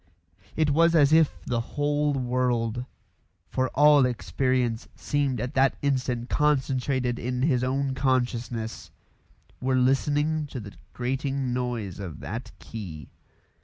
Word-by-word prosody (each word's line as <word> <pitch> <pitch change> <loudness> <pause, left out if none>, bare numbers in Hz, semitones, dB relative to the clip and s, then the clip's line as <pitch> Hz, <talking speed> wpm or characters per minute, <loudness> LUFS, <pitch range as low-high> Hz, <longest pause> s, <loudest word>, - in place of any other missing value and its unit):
It 155 -2 +2
was 165 +3 +4
as 145 -1 +5
if 160 -2 +4
the 120 -1 0
whole 145 +3 0
world 125 -2 0 0.7
for 130 0 0
all 145 0 +6
experience 125 -1 -1
seemed 140 -4 -1
at 125 +5 -3
that 135 0 +3
instant 125 -3 0
concentrated 130 -4 +1
in 125 +1 -2
his 130 -5 +2
own 135 +1 0
consciousness 120 -4 -1 0.7
were 130 0 +1
listening 145 +4 +1
to 135 - -6
the 105 -2 -9 0.2
grating 135 +1 -2
noise 120 -7 -3
of 85 -7 -6
that 115 +4 -6
key. 85 - -8
130 Hz, 125 wpm, -26 LUFS, 120-140 Hz, 0.7 s, all